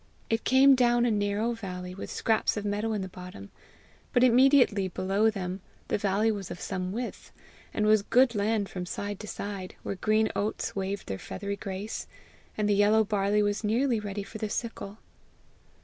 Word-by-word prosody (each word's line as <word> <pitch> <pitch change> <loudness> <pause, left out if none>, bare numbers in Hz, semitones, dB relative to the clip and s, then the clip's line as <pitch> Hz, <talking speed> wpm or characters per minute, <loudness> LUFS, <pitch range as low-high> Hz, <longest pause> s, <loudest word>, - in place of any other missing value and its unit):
It 225 0 +1
came 270 +1 +6
down 240 -2 +3
a 240 - +2
narrow 205 +2 0
valley, 180 -5 -6
with 195 - -7
scraps 220 -1 +1
of 210 - -3
meadow 205 +2 -1
in 205 -3 -2
the - - -4
bottom; 180 - -10 0.6
but 245 - +4
immediately 250 -5 +5
below 195 +4 +1
them 190 -3 -4 0.3
the - - +1
valley 205 +2 +2
was 200 -3 -5
of - - -7
some 185 -2 -3
width, 240 +4 -5 0.4
and 210 - 0
was 215 -1 +5
good 245 +4 +4
land 210 -1 0
from 180 -2 -6
side 205 +2 -4
to 215 - -8
side, 200 -3 -6
where - - -3
green 215 +3 +1
oats 210 +2 -2
waved 195 0 -3
their 95 -1 -4
feathery 200 +1 -5
grace, 200 +2 -5 0.5
and 210 -1 +1
the 205 - +3
yellow 210 +2 +4
barley 205 0 +1
was 205 +1 -1
nearly 235 +3 +1
ready 205 -1 -4
for 220 +2 -9
the 215 -1 -2
sickle. 215 -2 -4
205 Hz, 180 wpm, -28 LUFS, 195-225 Hz, 0.6 s, came